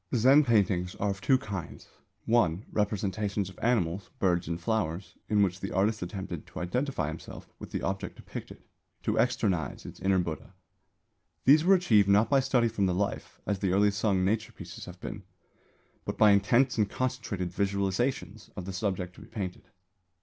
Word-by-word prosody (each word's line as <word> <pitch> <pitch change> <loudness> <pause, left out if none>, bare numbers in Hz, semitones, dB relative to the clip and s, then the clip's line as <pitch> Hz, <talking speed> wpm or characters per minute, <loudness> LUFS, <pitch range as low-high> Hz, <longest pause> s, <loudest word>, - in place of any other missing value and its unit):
Zen 135 +6 +6
paintings 100 -7 +2
are 100 0 0
of 95 -1 -6
two 130 +9 +4
kinds. 100 -9 -7 0.4
(1) 110 -5 +2
Representations 105 -1 -1
of 90 - -16
animals, 100 -6 0
birds 90 -4 +1
and 85 +1 -3
flowers, 90 -2 -2
in 105 -1 +4
which 95 -1 -1
the 95 - -5
artist 105 +4 +1
attempted 90 -2 -5
to - - -8
identify 125 - -1
himself 80 +1 -8
with - - -8
the - - -4
object 95 0 -3
depicted, - - -9 0.4
to - - 0
externise 85 -8 0
its - - -9
inner 95 0 +2
Buddha. 85 -4 -4 0.9
These 150 +4 +7
were 195 +3 +6
achieved 110 - +4
not 105 +5 +4
by 140 - +6
study 130 -3 +2
from 105 -4 0
the 90 - 0
life, 100 +2 -3
as 100 -2 -1
the 95 -2 0
early 100 +1 +4
Sung 100 -2 +1
nature 110 +3 0
pieces 85 -3 -9
have 90 0 -11
been, 100 - -6 0.8
but - - -4
by 105 -1 +7
intense 115 +6 +3
and 105 -2 +2
concentrated 105 -8 -3
visualisation 100 +4 -1 0.2
of 95 - -6
the 95 - -5
subject 90 -2 -2
to - - -15
be - - -12
painted. 95 -4 -6
100 Hz, 175 wpm, -29 LUFS, 90-110 Hz, 0.9 s, These